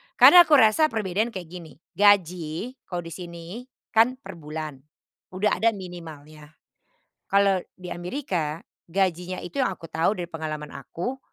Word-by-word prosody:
Karena 350 Hz, -1 st, +9 dB
aku 300 Hz, -, +6 dB
rasa 265 Hz, +6 st, +5 dB
perbedaan 215 Hz, -3 st, -1 dB
kayak 190 Hz, -6 st, -6 dB
gini, 175 Hz, -3 st, -10 dB, 0.2 s
gaji 180 Hz, 0 st, +2 dB, 0.2 s
kalau 175 Hz, -1 st, -4 dB
di 165 Hz, -, -9 dB
sini 175 Hz, +7 st, -8 dB, 0.2 s
kan 230 Hz, +3 st, +4 dB
per 170 Hz, -, -10 dB
bulan, 155 Hz, -2 st, -6 dB, 0.6 s
udah 210 Hz, +3 st, +1 dB
ada 225 Hz, -1 st, +3 dB
minimalnya. 155 Hz, -5 st, -11 dB, 0.7 s
Kalau 195 Hz, -1 st, +3 dB, 0.2 s
di 180 Hz, -1 st, -9 dB
Amerika, 175 Hz, -, -3 dB, 0.2 s
gajinya 180 Hz, 0 st, -1 dB
itu 225 Hz, +11 st, -6 dB
yang 255 Hz, -, +3 dB
aku 165 Hz, -, -13 dB
tahu 165 Hz, +6 st, +1 dB
dari 175 Hz, -2 st, -6 dB
pengalaman 155 Hz, -2 st, -5 dB
aku 210 Hz, -, -6 dB
180 Hz, 145 wpm, -25 LUFS, 165-210 Hz, 0.7 s, Karena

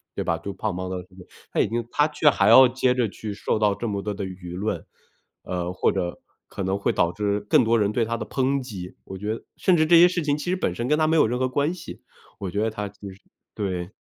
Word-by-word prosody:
对 -, -, -2 dB
吧？ 85 Hz, -, 0 dB
就 100 Hz, +4 st, -6 dB
胖 105 Hz, +1 st, -3 dB
猫 90 Hz, +1 st, -4 dB
的 95 Hz, -, -3 dB
那 95 Hz, -, -20 dB
个 90 Hz, -, -12 dB, 0.3 s
他 -, -, -1 dB
已 -, -, +3 dB
经 115 Hz, +1 st, -2 dB
他 150 Hz, +1 st, +3 dB
却 150 Hz, 0 st, +3 dB
还 100 Hz, -7 st, +2 dB
要 130 Hz, +2 st, +9 dB
接 130 Hz, 0 st, +1 dB
着 120 Hz, -4 st, +1 dB
去 105 Hz, 0 st, -6 dB
受 105 Hz, -, -1 dB
到 105 Hz, -2 st, +2 dB
这 120 Hz, -, -4 dB
么 100 Hz, -1 st, -2 dB
多 105 Hz, -1 st, -2 dB
的 100 Hz, 0 st, -5 dB
舆 90 Hz, -2 st, -8 dB
论， 100 Hz, -3 st, -3 dB, 0.6 s
呃， 90 Hz, 0 st, -3 dB
或 -, -, +2 dB
者 90 Hz, -2 st, -3 dB, 0.3 s
可 95 Hz, -, -5 dB
能 95 Hz, +1 st, 0 dB
会 -, -, +1 dB
导 85 Hz, -, +2 dB
致 105 Hz, +1 st, -1 dB
更 105 Hz, -, +3 dB
多 115 Hz, +1 st, +3 dB
人 105 Hz, 0 st, +1 dB
对 115 Hz, +1 st, +1 dB
他 115 Hz, +1 st, -2 dB
的 110 Hz, -, -5 dB
抨 135 Hz, +3 st, 0 dB
击， 95 Hz, -8 st, -8 dB
我 95 Hz, -, -7 dB
觉 105 Hz, +3 st, -2 dB
得 -, -, -11 dB
甚 185 Hz, -, +3 dB
至 155 Hz, -, +4 dB
这 170 Hz, +1 st, +7 dB
些 175 Hz, -, +9 dB
事 175 Hz, -1 st, -1 dB
情 145 Hz, 0 st, +1 dB
其 -, -, -6 dB
实 -, -, +2 dB
本 90 Hz, -, -1 dB
身 120 Hz, +4 st, -3 dB
跟 150 Hz, -, +3 dB
他 155 Hz, -, +3 dB
没 160 Hz, -, +2 dB
有 110 Hz, -, +5 dB
任 125 Hz, +2 st, -1 dB
何 130 Hz, 0 st, +1 dB
关 145 Hz, +6 st, 0 dB
系， 175 Hz, -2 st, -10 dB, 0.4 s
我 95 Hz, -3 st, -4 dB
觉 100 Hz, -, -1 dB
得 110 Hz, -, +1 dB
他 105 Hz, -1 st, -4 dB
其 100 Hz, 0 st, -23 dB
实 95 Hz, -, -16 dB, 0.3 s
对。 90 Hz, -1 st, -3 dB
105 Hz, 300 characters per minute, -24 LUFS, 95-130 Hz, 0.6 s, 要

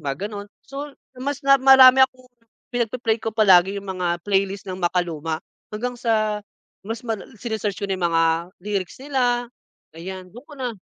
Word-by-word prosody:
mga 145 Hz, +6 st, -3 dB
gano'n. 205 Hz, -1 st, -7 dB, 0.2 s
So, 280 Hz, +1 st, -7 dB, 0.2 s
mas 275 Hz, +2 st, -3 dB
na 275 Hz, 0 st, +7 dB
marami 265 Hz, 0 st, +8 dB
akong 255 Hz, -1 st, -12 dB, 0.4 s
pinag-pe-play 235 Hz, -1 st, 0 dB
ko 225 Hz, -, -3 dB
palagi 195 Hz, -3 st, +5 dB
yung 200 Hz, -, -13 dB
mga 180 Hz, -2 st, -2 dB
playlist 195 Hz, 0 st, 0 dB
ng 185 Hz, -, -4 dB
makaluma, 165 Hz, -3 st, -1 dB, 0.3 s
hanggang 245 Hz, +3 st, -3 dB
sa, 215 Hz, -3 st, 0 dB, 0.4 s
mas 225 Hz, +2 st, -5 dB
mal 225 Hz, -2 st, -1 dB, 0.2 s
sine-search 220 Hz, -4 st, -3 dB
ko 200 Hz, -, -2 dB
na 195 Hz, -, 0 dB
yung 175 Hz, -2 st, 0 dB
mga 165 Hz, -, +3 dB, 0.4 s
lyrics 200 Hz, -1 st, -3 dB
nila. 245 Hz, -3 st, 0 dB, 0.5 s
Ayan 185 Hz, +2 st, -8 dB
do'n 240 Hz, +8 st, -13 dB
ko 295 Hz, -, -12 dB
na 245 Hz, -4 st, -4 dB
215 Hz, 165 wpm, -22 LUFS, 190-250 Hz, 0.5 s, marami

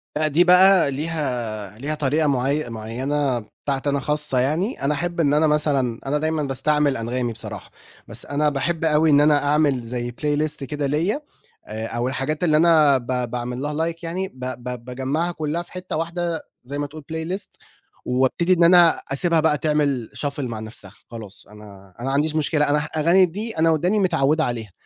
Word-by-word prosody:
لأ، 155 Hz, 0 st, +1 dB
دي 160 Hz, +4 st, +4 dB
بقى 180 Hz, -3 st, +6 dB
ليها 125 Hz, -9 st, -3 dB
ليها 150 Hz, +3 st, -2 dB
طريقة 150 Hz, +2 st, +1 dB
معي 140 Hz, 0 st, 0 dB
معيّنة 125 Hz, +4 st, -2 dB
بتاعتي 135 Hz, +5 st, -4 dB
أنا 140 Hz, 0 st, 0 dB
خاصة 150 Hz, -2 st, 0 dB
يعني، 160 Hz, -, -1 dB
أنا 145 Hz, +2 st, +2 dB
أحب 170 Hz, +3 st, -3 dB
إن 145 Hz, -3 st, +3 dB
أنا 155 Hz, +1 st, +4 dB
مثلًا 140 Hz, -6 st, +1 dB
أنا 145 Hz, +2 st, 0 dB
دايمًا 155 Hz, 0 st, -1 dB
باستعمل 140 Hz, +1 st, +1 dB
أنغامي 120 Hz, +1 st, -2 dB
بصراحة، 105 Hz, -3 st, -8 dB, 0.4 s
بس -, -, -5 dB
أنا 150 Hz, +1 st, +1 dB
باحب 160 Hz, +4 st, -1 dB
أوي 155 Hz, 0 st, +3 dB
إن 145 Hz, 0 st, +6 dB
أنا 150 Hz, -1 st, +4 dB
أعمل 145 Hz, -4 st, +2 dB
زي 120 Hz, 0 st, -4 dB
playlist 150 Hz, +3 st, -1 dB
كده 145 Hz, +2 st, -3 dB
ليّا 170 Hz, -, 0 dB, 0.4 s
آآ، 110 Hz, +1 st, -5 dB
أو 120 Hz, +2 st, -2 dB
الحاجات 145 Hz, +5 st, -2 dB
اللي 155 Hz, -3 st, +4 dB
أنا 155 Hz, -4 st, +5 dB
ب 125 Hz, -1 st, -3 dB
باعمل 125 Hz, +1 st, -4 dB
لها 155 Hz, +3 st, -1 dB
like -, -, -11 dB
يعني 185 Hz, +3 st, -3 dB
ب 130 Hz, -, -19 dB, 0.2 s
ب 125 Hz, -1 st, -6 dB
باجمّعها 135 Hz, +7 st, -2 dB
كلّها 160 Hz, +1 st, -3 dB
في -, -, -14 dB
حتّة 185 Hz, -2 st, -6 dB
واحدة 170 Hz, 0 st, -2 dB, 0.2 s
زي 140 Hz, +3 st, -6 dB
ما 145 Hz, 0 st, -2 dB
تقول 155 Hz, +1 st, -11 dB
playlist 180 Hz, +5 st, -4 dB, 0.5 s
وابتدي 130 Hz, +8 st, +2 dB
إن 170 Hz, -1 st, +3 dB
أنا 170 Hz, -1 st, +6 dB
أسيبها 165 Hz, +3 st, +2 dB
بقى 150 Hz, -1 st, +2 dB
تعمل 145 Hz, -6 st, 0 dB, 0.2 s
shuffle 145 Hz, 0 st, -3 dB
مع 120 Hz, -5 st, -3 dB
نَفْسها 110 Hz, -3 st, -9 dB, 0.2 s
خلاص 110 Hz, -4 st, -10 dB
أنا 100 Hz, -3 st, -14 dB
أنا 125 Hz, -, -4 dB
ما 135 Hz, -, -1 dB
عنديش 155 Hz, +2 st, +1 dB
مشكلة 150 Hz, -1 st, +1 dB
أنا 150 Hz, +1 st, +3 dB
ه 150 Hz, -, -3 dB
الأغاني 170 Hz, +5 st, +3 dB
دي 210 Hz, +5 st, -5 dB
أنا 165 Hz, +1 st, +3 dB
وداني 180 Hz, +7 st, +1 dB
متعوّد 160 Hz, -4 st, +2 dB
عليها، 115 Hz, -, -3 dB
145 Hz, 185 wpm, -22 LUFS, 125-160 Hz, 0.5 s, بقى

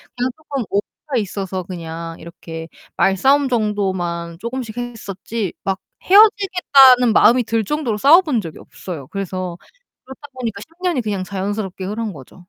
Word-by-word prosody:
그냥 250 Hz, +1 st, -1 dB
쪼끔 280 Hz, -5 st, -4 dB
오해가 245 Hz, +7 st, -3 dB
있어서 190 Hz, -2 st, -4 dB
그냥 165 Hz, -2 st, -7 dB
이렇게 165 Hz, -1 st, -9 dB, 0.3 s
말싸움 265 Hz, +10 st, +3 dB
정도만 190 Hz, -7 st, -1 dB
쪼금씩 235 Hz, -1 st, -5 dB
했었지 225 Hz, -3 st, -5 dB
막 190 Hz, 0 st, -1 dB, 0.2 s
헤어지겠다는 360 Hz, -, +6 dB
마음이 245 Hz, +3 st, +5 dB
들 225 Hz, 0 st, 0 dB
정도로 265 Hz, -3 st, -2 dB
싸워 300 Hz, -, +7 dB
본 275 Hz, -, -1 dB
적이 165 Hz, -4 st, -9 dB
없어요. 155 Hz, -8 st, -9 dB
그래서 185 Hz, -3 st, -4 dB, 0.5 s
그렇다 265 Hz, +2 st, -12 dB
보니까 230 Hz, -6 st, -5 dB
10 -, -, -11 dB, 0.2 s
년이 340 Hz, -9 st, +1 dB
그냥 200 Hz, -4 st, -2 dB
자연스럽게 195 Hz, -1 st, -4 dB
흐른 215 Hz, 0 st, -3 dB
거죠. 135 Hz, -4 st, -13 dB
210 Hz, 340 characters per minute, -19 LUFS, 185-255 Hz, 0.5 s, 싸워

